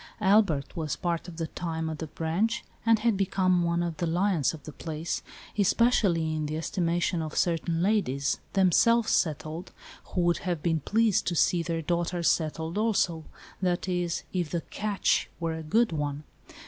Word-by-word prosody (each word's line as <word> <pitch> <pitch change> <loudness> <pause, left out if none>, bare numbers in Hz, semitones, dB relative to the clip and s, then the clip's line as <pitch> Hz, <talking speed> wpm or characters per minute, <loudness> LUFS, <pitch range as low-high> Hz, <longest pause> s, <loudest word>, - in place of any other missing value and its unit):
Albert 190 -9 +3
was, 155 -4 -2
part 170 -1 -2
of 170 -2 -9
the 165 - -1
time, 160 0 -4
at 160 -1 -4
the 160 - -4
Branch, 180 +10 -1 0.2
and 225 -1 +6
had 225 0 +1
become 185 -2 +2
one 170 0 +1
of 170 -2 -3
the 170 - -1
lions 175 -3 +2
of 160 -3 -10
the 155 - -8
place, 160 +2 -4 0.4
especially 195 -6 +3
in 155 -1 -2
the 155 +1 -3
estimation 170 +1 0
of 155 -1 -5
certain 170 0 +1
ladies, 140 -10 +1
themselves 215 +5 +4
settled, 160 +2 -1 0.3
who 180 - -2
would 175 0 +2
have 175 -5 -3
been 165 -2 +1
pleased 220 +6 +2
to 175 - 0
see 170 +2 +3
their 165 -1 -2
daughters 170 +1 0
settled 160 +3 0
also 185 -8 +1 0.2
— - - -20
that 180 0 0
is, 175 -2 -1
if 175 -4 -1
the 170 +1 -2
" - - -30
catch 210 -2 +1
" - - -34
were 165 -1 -1
a 160 - -5
good 220 +9 +2
one. 145 -1 -3
170 Hz, 185 wpm, -28 LUFS, 160-190 Hz, 0.4 s, and